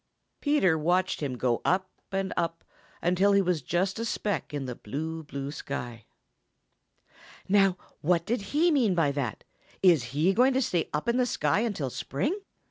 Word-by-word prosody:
Peter 240 - +3
watched 180 +4 +1
him 135 -4 -2
go 120 -1 0
up 185 +1 +1 0.2
and 195 0 -1
up 165 0 -2 0.4
until 185 +3 +3
he 200 - +5
was 180 -4 0
just 185 - -1
a - - -1
speck 210 -3 -2
in 145 -2 -3
the 125 - -4
blue, 160 +9 -5
blue 140 -2 -5
sky. 120 -6 -6 1.4
"Now 195 -2 +4 0.2
what 170 +1 +1
did 235 0 -1
he 335 +3 +4
mean 240 - +3
by 160 -4 +3
that? 140 -6 -3 0.4
Is 165 -10 +5
he 150 +10 +1
going 255 +5 +4
to 265 - +3
stay 175 -7 -1
up 150 +6 -2
in 235 +1 +2
the 250 -1 +2
sky 150 -4 +1
until 200 - -2
spring?" 145 - -2
175 Hz, 170 wpm, -28 LUFS, 145-200 Hz, 1.4 s, he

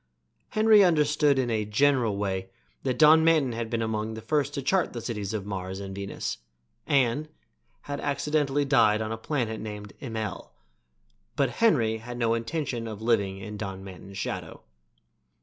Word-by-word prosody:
Henry 215 -1 +6
understood 150 -4 +3
in 125 -3 0
a 110 -1 +1
general 115 0 +2
way 95 -2 -2 0.3
that 125 - -1
Don 160 +1 +7
Manton 160 -6 +3
had 115 0 -4
been 115 -1 -1
among 110 0 -2
the 110 - -7
first 145 +2 0
to 140 - -2
chart 185 +5 +1
the 120 - -4
cities 105 -4 -4
of 105 -3 -3
Mars 95 -1 -5
and 100 -1 -6
Venus, 100 -10 -4 0.5
and 140 +2 +2 0.5
had 145 0 -5
accidentally 145 0 0
died 110 -6 +4
on 110 0 -3
a - - -1
planet 115 -5 -2
named 105 -1 -7
Immel; 110 - -5 0.8
but 140 -4 +1
Henry 120 - +2
had 120 +2 -8
no 115 -1 +2
intention 115 0 -3
of 110 -1 -7
living 100 -5 +1
in 105 +2 -7
Don 95 -2 -5
Manton's 95 0 -10
shadow. - - -5
115 Hz, 165 wpm, -27 LUFS, 105-145 Hz, 0.8 s, Don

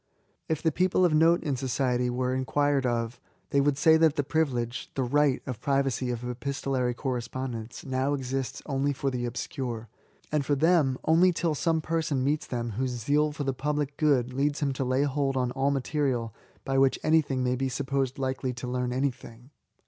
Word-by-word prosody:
If 160 -1 -1
the 160 - +3
people 185 +3 +2
,of 170 - +2
note 165 +3 +4
in 145 -4 -1
society 125 -1 0
were 125 +1 -1
inquired 140 +1 +1
o^ 115 -1 -1 0.3
they 140 - +4
would 140 -1 +2
say 160 +2 +6
that 160 -2 +4
the 145 - +1
privilege— 125 -6 -1
the 135 - 0
right 140 +1 +2
— - - -36
of 125 -3 -5
privacy 135 -2 0
of 120 0 -3
epistolary 130 -1 -2
correspondence 125 -2 -4
now 130 +2 0
exists 135 -1 -4
only 140 0 0
for 135 0 -2
the 125 -1 -2
obscure; 120 -2 -4 0.2
— - - -33
and 150 -2 +1
for 145 +1 +1
them, 150 -3 +3
only 170 +3 +5
till 165 -2 0
some 160 +2 +1
person 155 -4 -1
meets 150 +3 0
them 120 -2 -3
whose 125 +3 -2
zeal 150 +4 +2
for 145 0 -4
the 135 -1 -1
public 145 +1 -1
92 - - +3
£S8AY8« - - +5 0.2
good 125 - -10
leads 145 +2 0
him 140 -3 0
to 135 - -2
lay 130 +2 +1
hold 140 -1 0
on 125 -1 0
all 135 +2 +1
material 135 -5 -1 0.3
by 135 -1 +1
which 135 -1 +4
anybody 155 -3 +3
may 125 -1 +1
be 135 +1 -1
supposed 135 +1 -1
likely 130 -1 -2
to 120 +1 -7
learn 125 0 -1
anything. 125 -1 -4
135 Hz, 200 wpm, -28 LUFS, 125-145 Hz, 0.3 s, say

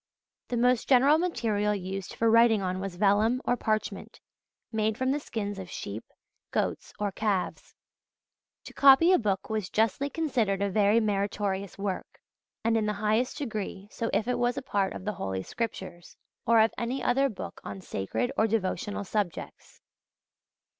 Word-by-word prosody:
The 245 - -2
most 245 0 +2
general 275 +4 +6
material 220 - 0
used 190 0 -5
for 230 - +1
writing 225 -2 +5
on 185 0 -2
was 190 -2 -5
vellum 210 +5 +3
or 245 - +2
parchment, 215 -3 -3 0.5
made 220 -1 0
from 260 0 +1
the 290 - 0
skins 205 -7 -4
of 185 -2 -8
sheep, 105 -6 -6 0.5
goats, - - -2
or 205 -1 -1
calves. 200 -2 -2 0.9
To - - -11
copy 280 +6 +7
a - - +5
book 200 -5 -1
was 215 -4 -2
justly 225 +6 +1
considered 245 - 0
a 200 0 0
very 210 +2 +4
meritorious 200 -2 -1
work, 195 -2 -4 0.4
and 230 0 +2
in 215 -1 0
the 210 - 0
highest 215 +6 0
degree 210 -7 -5
so 230 - -3
if 210 +3 0
it 250 - 0
was 245 +2 +1
a 275 - -3
part 200 -6 0
of 185 - -8
the 210 - -1
Holy 95 - -3
Scriptures, 190 - -6 0.3
or 230 0 +6
of 220 +1 +4
any 245 +3 -2
other 270 +2 +3
book 210 - -8
on - - -6
sacred 185 - -2
or 220 - +3
devotional 205 -1 -1
subjects. 200 -3 -4
215 Hz, 165 wpm, -28 LUFS, 195-240 Hz, 0.9 s, copy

